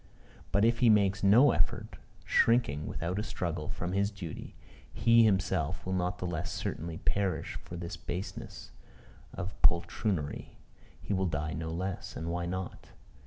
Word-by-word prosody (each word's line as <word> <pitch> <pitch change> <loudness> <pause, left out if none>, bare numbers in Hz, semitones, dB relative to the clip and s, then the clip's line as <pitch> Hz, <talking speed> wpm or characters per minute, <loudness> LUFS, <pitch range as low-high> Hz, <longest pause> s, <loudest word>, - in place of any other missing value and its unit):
But 100 +3 +4
if 115 +1 +3
he 120 - +5
makes 100 -2 +4
no 120 +8 +7
effort, - - -1 0.3
shrinking, 115 -12 +3
without 90 +4 -2
a - - -1
struggle, 85 -7 -3
from 90 +1 -3
his 100 +1 +2
duty, 100 -7 -8 0.4
he 115 0 +5
himself 95 -6 +1
will 95 - -2
not 90 -1 0
the - - -4
less 85 -1 -3
certainly 80 +1 -4
perish 95 -6 -1
for 85 - -8
this 85 +1 -5
baseness 90 +3 -6 0.6
of 100 0 -5
poltroonery. 85 -2 +1 0.5
He - - -2
will 95 -1 +1
die 75 -1 -2
no 80 +2 -4
less: 90 +3 -4
and 80 +1 -3
why 85 0 -2
not? 95 +1 -5
90 Hz, 155 wpm, -31 LUFS, 85-100 Hz, 0.6 s, no